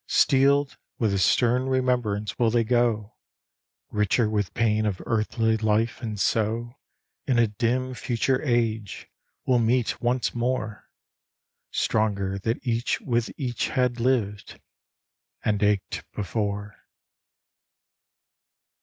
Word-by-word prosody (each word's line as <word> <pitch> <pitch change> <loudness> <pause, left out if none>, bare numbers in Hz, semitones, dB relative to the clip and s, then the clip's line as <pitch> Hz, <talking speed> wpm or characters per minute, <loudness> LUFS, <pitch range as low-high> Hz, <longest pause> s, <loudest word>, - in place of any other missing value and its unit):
Steeled 140 +1 +3 0.2
with 110 -3 +1
the 100 - 0
stern 125 +6 +2
remembrance 125 -6 0
will 120 -2 +4
they 115 0 +2
go, 115 -2 +1 0.8
Richer 105 +2 +2
with 105 -3 -1
pain 110 -2 +2
of 95 -4 -2
earthly 110 0 +1
life, 110 +2 0
and 110 -4 -4
so, 115 +3 0 0.5
In 130 -3 +2
a 115 - +5
dim, 120 +4 -1
future 125 +3 0
age, 115 - -1 0.4
will 125 -2 +3
meet 120 +1 +1
once 120 +1 0
more, 120 -3 -3 0.8
Stronger 100 -3 0
that 115 +6 -2
each 120 0 0
with 120 -3 -1
each 125 -4 -2
had 125 -2 0
lived 115 -5 -1 0.9
and 105 -2 +1
ached 105 -1 0
before. 105 0 -3
115 Hz, 110 wpm, -25 LUFS, 105-125 Hz, 0.9 s, a